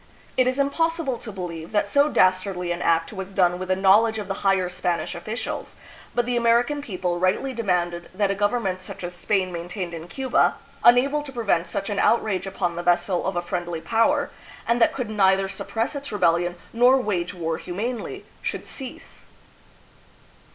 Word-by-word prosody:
It 255 -1 +3
is 255 +1 0
impossible 285 -1 0
to 220 - -7
believe 170 -4 -6
that 205 - +2
so 285 +1 +3
dastardly 185 -4 +2
an 175 0 -3
act 165 +3 +1
was 190 -1 -6
done 180 -2 +2
with 185 - -4
the 185 - +2
knowledge 210 +4 +4
of 210 -3 -4
the 195 - -1
higher 195 -2 +2
Spanish 180 -1 -2
officials; 215 +7 -5 0.4
but 240 -1 +2
the 245 0 -1
American 240 +5 +2
people 180 -8 -2
rightly 190 +9 +1
demanded 175 -6 -1
that 200 +1 +1
a - - +1
government 200 -2 0
such 185 - -9
as 175 0 -4
Spain 185 +1 0
maintained 175 +1 -5
in 165 0 -7
Cuba, 260 +6 +1 0.3
unable 265 +5 +5
to 290 -2 -8
prevent 200 -9 0
such 195 +3 -3
an 200 - -1
outrage 210 -5 +2
upon 175 -3 -2
the - - -1
vessel 175 +1 +1
of 190 - -2
a 175 - -1
friendly 175 -2 -3
power, 225 +6 +1 0.4
and 235 +1 +2
that - - +5
could 250 -5 -4
neither 195 -2 +3
suppress 225 +7 -3
its 280 -1 -5
rebellion 175 -3 +2 0.2
nor 245 +3 +5
wage 195 -6 -2
war 165 -2 -2
humanely, 220 +7 -4 0.2
should - - -4
cease. 265 -3 -9
195 Hz, 180 wpm, -24 LUFS, 175-235 Hz, 0.4 s, unable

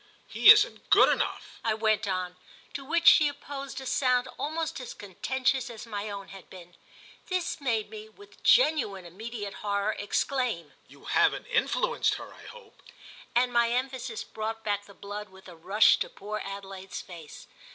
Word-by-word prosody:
"He - - +5
isn't - - +3
good - - +7
enough!" - - -2
I 220 -1 +1
went 215 -1 +1
on; 185 -1 -2 0.4
to 275 - -5
which 335 +4 -1
she 300 - +8
opposed 280 -2 -6
a 265 - -9
sound 250 -1 +1
almost 315 0 -3
as 255 - -8
contentious 255 +6 -1
as 230 -1 -9
my 210 -2 -5
own 200 -1 -7
had 195 -2 -12
been. 175 -2 -13 0.5
This 365 -4 -2
made 230 -6 0
me, 215 0 -9
with 410 - -18
genuine 280 - +3
immediate 205 +3 -7
horror, 200 0 0
exclaim: 205 - -1
"You - - -17
haven't - - +2
influenced - - +1
her, - - -9
I - - -14
hope!" 485 0 -14 0.5
and 245 +1 +2
my 235 -1 +3
emphasis 250 -1 -3
brought 220 +1 -5
back 205 -1 -1
the 200 - -15
blood 205 +1 -7
with 190 0 -16
a 180 - -11
rush 195 +6 +4
to - - -2
poor 210 +2 -6
Adelaide's 195 -1 -7
face. 170 -5 -11
220 Hz, 165 wpm, -28 LUFS, 200-265 Hz, 0.5 s, she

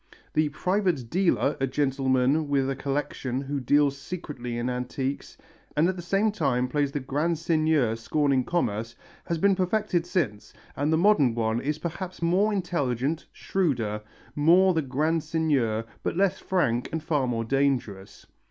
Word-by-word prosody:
The 155 -1 +2
"private 180 - -1
dealer," 175 -6 +2
a 135 - +1
gentleman 135 +1 +1
with 135 -2 +2
a - - -2
collection 135 -2 -2
who 140 +1 -3
deals 140 +2 +3
secretly 140 -8 -6
in 120 +1 -2
antiques 125 +2 -3 0.4
and 155 +3 +4
at 185 - 0
the 175 - -6
same 195 +5 +1
time 135 -10 0
plays 145 +1 0
the 145 - -2
grand 150 +5 -1
seigneur 155 -7 +2
scorning 135 +3 +1
commerce, 115 -8 -2 0.3
has 170 -2 -1
been 195 +4 +4
perfected 185 -2 0
since, 115 - -2 0.2
and 145 +3 0
the 160 - +3
modern 160 - +4
one 115 0 0
is 150 +2 -1
perhaps 175 +3 -5
more 185 +6 +2
intelligent, 155 - -1
shrewder, 120 - -1 0.3
more 175 +5 +5
the 160 - +1
grand 155 +4 0
seigneur, 145 -9 0 0.2
but - - -2
less 195 -1 +2
frank 125 -11 0
and 160 -1 -3
far 145 -5 0
more 115 -2 -1
dangerous. 125 -7 -1
145 Hz, 155 wpm, -26 LUFS, 125-170 Hz, 0.4 s, more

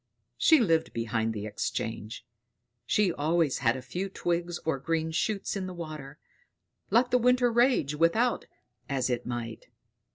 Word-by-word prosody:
She 320 -2 +6
lived 165 -8 +2
behind 115 -1 -1
the 105 -2 -5
Exchange. 110 +2 -4 0.6
She 200 -5 +2
always 160 -1 +1
had 120 0 +2
a 130 - -8
few 180 +10 -4
twigs 175 -2 -2
or 160 -4 0
green 160 +2 -1
shoots 200 +6 -1
in 190 -2 -3
water 155 -4 -7 0.7
let 235 +4 +3
the 250 - +4
winter 250 0 +3
rage 235 - +3
without 170 +11 +2 0.4
as 130 -2 0
it 120 - -2
might. 120 -2 -5
160 Hz, 140 wpm, -28 LUFS, 125-195 Hz, 0.7 s, She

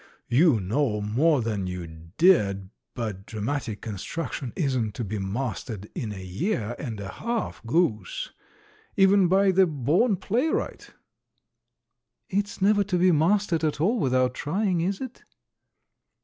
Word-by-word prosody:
"You 135 0 +4
know 105 +3 0
more 125 +7 +2
than 105 -4 -2
you 90 -1 -5 0.3
did, 100 - +3 0.2
but 105 -5 -5
dramatic 110 0 -3
construction 120 - -4
isn't 130 - -1
to 120 - -3
be 105 0 -4
mastered 105 0 -4
in 110 - -4
a 95 -2 -7
year 115 - -2
and 115 -7 -5
a 100 - -5
half, 235 - -3
goose, 170 - 0 0.7
even 195 -1 +5
by 190 +2 +4
the 190 0 +4
born 160 - +2
playwright." 245 - -2 1.4
"It's 200 0 -1
never 205 0 +4
to 190 -2 -1
be 180 +1 +4
mastered 170 +1 +2
at 150 -2 0
all 215 +10 +2
without 130 -4 +2
trying, 180 +5 0
is 190 +5 -1
it?" 260 -2 -7
145 Hz, 135 wpm, -26 LUFS, -, 1.4 s, even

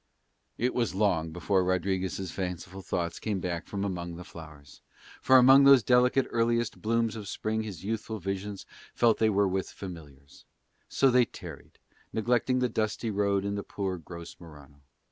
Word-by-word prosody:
It 125 +2 0
was 115 -6 -1
long 90 -6 +1
before 90 +3 0
Rodriguez' 95 0 -1
fanciful 95 +1 -5
thoughts 85 -2 -3
came 105 -3 -2
back 85 -2 -4
from 100 -1 -4
among 85 -3 -4
the 90 - -8
flowers, 75 -4 -13 0.4
for 130 - +6
among 135 +2 +7
those 135 -3 +7
delicate 125 +2 +3
earliest 115 0 0
blooms 115 0 0
of 105 -3 -7
Spring 110 +2 -2
his 100 -6 -7
youthful 110 +1 -3
visions 95 +1 -5 0.3
felt 115 -2 +3
they 110 - +3
were 100 -1 +2
with 95 0 -2
familiars; 75 -7 -11 0.5
so 135 -1 +3
they 125 0 +5
tarried, - - -11 0.4
neglecting 120 +3 +1
the 125 0 +2
dusty 110 0 -2
road 100 -1 0
and 100 0 -2
poor 95 -3 -3
gross 85 +1 -10
Morano. 75 -4 -15
100 Hz, 160 wpm, -28 LUFS, 90-115 Hz, 0.5 s, among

